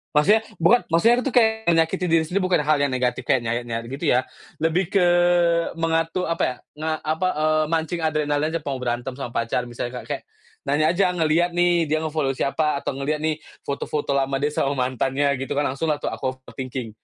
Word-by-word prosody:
Maksudnya 210 +9 +5 0.2
bukan 220 +9 +4
maksudnya 230 +10 +4
itu 275 - -1
kayak 220 -5 +2
menyakiti 165 +2 +2
diri 165 -1 +4
sendiri 185 +5 -1
bukan 180 -5 +1
hal 150 -2 +3
yang 140 - +2
negatif 125 -1 -1
kayak 125 -3 +2
nyayat-nyayat 115 0 -2
gitu 150 +4 -4
ya, 125 +1 +3 0.3
lebih 165 +3 0
ke 185 -3 +3 0.7
mengatur 165 +2 0
apa 165 0 -1
ya 125 - -5 0.3
nge 160 0 -1 0.2
apa? 185 +3 -1
Eee, 155 0 +2
mancing 165 +1 -1
adrenalinnya 155 0 0
atau 145 -3 -4
mau 130 - -5
berantem 120 +1 -2
sama 130 -2 -6
pacar 120 +1 -2
misalnya 120 +1 -5
Kak - - -15
kayak - - -3 0.4
nanya 145 +3 +2
aja 180 0 +2
ngelihat 170 +1 +1
nih 175 -1 +3
dia 155 +1 0
nge-follow 155 -4 -1
siapa 140 +2 0
atau 135 - -4
ngelihat 150 +2 -2
nih 155 -1 0 0.2
foto-foto 140 +1 -3
lama 135 0 0
dia 145 - +2
sama 140 -1 0 0.2
mantannya 135 +2 0
gitu 135 - -4
kan 145 +1 0
langsung 140 +5 -3
lah 150 -2 0
tuh - - -1
aku 130 -1 -4
overthinking. 130 -3 -6
155 Hz, 195 wpm, -23 LUFS, 135-165 Hz, 0.7 s, Maksudnya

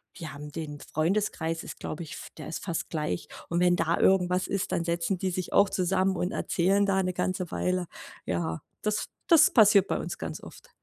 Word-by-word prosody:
wir 160 -7 -7
haben 150 +1 -8
den 150 -2 -6
Freundeskreis 165 -1 -1
ist, - - -9
glaube 155 - -5
ich 155 - -9
f - - -8
der - - -7
ist 160 - -5
fast 170 -3 -3
gleich. 90 - -2 0.2
Und 170 - 0
wenn 180 0 +4
da 165 -1 +1
irgendwas 180 -1 +3
ist, 195 -2 -2
dann 170 - 0
setzen 170 +3 -1
die 190 - 0
sich 185 0 -4
auch 200 0 +5
zusammen 190 +1 +1
und 180 +3 -1
erzählen 195 0 +2
da 190 -1 +2
'ne 185 0 -1
ganze 185 -1 -2
Weile. 180 0 0 0.4
Ja, 85 -2 -2 0.2
das 210 0 -1 0.2
das 325 -3 +7
passiert 205 -4 +6
bei - - 0
uns - - -5
ganz - - -6
oft. - - -13
180 Hz, 205 wpm, -28 LUFS, 165-195 Hz, 0.4 s, das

